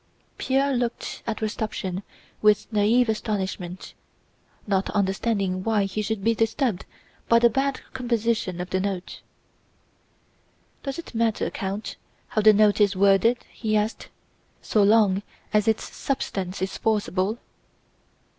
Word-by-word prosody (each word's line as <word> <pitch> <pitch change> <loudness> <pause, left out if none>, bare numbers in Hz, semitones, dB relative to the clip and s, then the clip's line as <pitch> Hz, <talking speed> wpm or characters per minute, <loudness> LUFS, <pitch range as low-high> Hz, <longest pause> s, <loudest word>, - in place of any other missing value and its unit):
Pierre 275 +1 +1
looked 245 -2 -3
at 225 -1 -3
Rostopchín 215 -4 -3 0.4
with 210 -1 +4
naïve 220 +4 +4
astonishment, 190 -4 -3 0.7
not 195 -2 0
understanding 195 -1 0
why 215 -2 +2
he 195 +2 -2
should 210 -1 -3
be 230 +2 +3
disturbed 225 -2 0 0.4
by 230 - +6
the 235 0 +5
bad 270 +3 0
composition 230 -7 -1
of 180 +1 -5
the 185 - +1
Note. 190 -2 -4 1.6
"Does 275 -1 -4
it 335 - -8
matter, 225 -1 0
Count, 200 +2 -4 0.3
how 215 - +1
the 215 +1 +8
Note 210 0 +4
is 200 -1 +4
worded," 200 +5 +3
he 215 -2 0
asked, 210 +2 -2 0.5
"so 215 - +1
long 200 -2 +4 0.3
as 210 0 +3
its 220 -1 0
substance 190 -8 -3
is 190 - -4
forcible?" 210 -1 0
215 Hz, 125 wpm, -25 LUFS, 195-230 Hz, 1.6 s, the